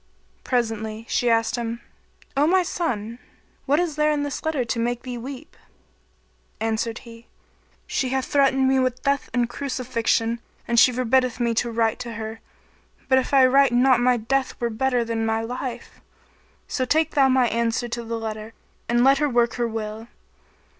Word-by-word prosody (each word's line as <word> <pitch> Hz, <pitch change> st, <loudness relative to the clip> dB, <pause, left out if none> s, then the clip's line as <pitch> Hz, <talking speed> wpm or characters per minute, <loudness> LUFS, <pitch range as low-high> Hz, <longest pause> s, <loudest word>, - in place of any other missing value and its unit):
Presently 225 Hz, -3 st, -2 dB
she 245 Hz, -, +1 dB
asked 225 Hz, 0 st, +2 dB
him, 235 Hz, 0 st, -3 dB, 0.6 s
"O 285 Hz, +2 st, +3 dB
my 370 Hz, +2 st, +4 dB
son, 235 Hz, -10 st, -3 dB, 0.5 s
what 290 Hz, +3 st, +3 dB
is 335 Hz, -4 st, -1 dB
there 300 Hz, 0 st, +3 dB
in 295 Hz, -1 st, 0 dB
this 285 Hz, -2 st, -4 dB
letter 305 Hz, -6 st, -1 dB
to 230 Hz, 0 st, -2 dB
make 240 Hz, +1 st, -1 dB
thee 250 Hz, -1 st, -5 dB
weep?" 265 Hz, +5 st, -8 dB, 1.0 s
Answered 225 Hz, +1 st, -1 dB
he, 230 Hz, 0 st, -13 dB, 0.6 s
"She 260 Hz, -, -1 dB
hath 265 Hz, 0 st, -1 dB
threatened 270 Hz, -2 st, +3 dB
me 265 Hz, 0 st, +3 dB
with 255 Hz, -1 st, -1 dB
death 280 Hz, 0 st, 0 dB
and 240 Hz, 0 st, +1 dB
crucifixion 235 Hz, -3 st, -1 dB, 0.3 s
and 235 Hz, -1 st, +3 dB
she 250 Hz, -, +7 dB
forbiddeth 255 Hz, 0 st, +1 dB
me 235 Hz, -1 st, +1 dB
to 235 Hz, +1 st, 0 dB
write 225 Hz, -1 st, 0 dB
to 235 Hz, -1 st, -6 dB
her, 220 Hz, 0 st, -6 dB, 0.7 s
but 260 Hz, -1 st, +5 dB
if 260 Hz, -, -4 dB
I 270 Hz, -2 st, +6 dB
write 270 Hz, 0 st, +4 dB
not 250 Hz, 0 st, +4 dB
my 250 Hz, 0 st, +3 dB
death 260 Hz, +4 st, -1 dB
were 235 Hz, -1 st, -1 dB
better 245 Hz, +1 st, 0 dB
than 225 Hz, -1 st, -2 dB
my 225 Hz, 0 st, 0 dB
life. 245 Hz, 0 st, -6 dB, 0.7 s
So 260 Hz, -, -1 dB
take 310 Hz, +4 st, +1 dB
thou 270 Hz, -2 st, +4 dB
my 255 Hz, -1 st, +3 dB
answer 235 Hz, +1 st, 0 dB
to 235 Hz, 0 st, -4 dB
the 230 Hz, 0 st, -4 dB
letter 220 Hz, 0 st, -6 dB, 0.4 s
and 240 Hz, +1 st, +3 dB
let 270 Hz, +1 st, +5 dB
her 295 Hz, -, +1 dB
work 240 Hz, -2 st, +2 dB
her 235 Hz, -, +2 dB
will." 220 Hz, 0 st, -5 dB
240 Hz, 175 wpm, -23 LUFS, 230-265 Hz, 1.0 s, she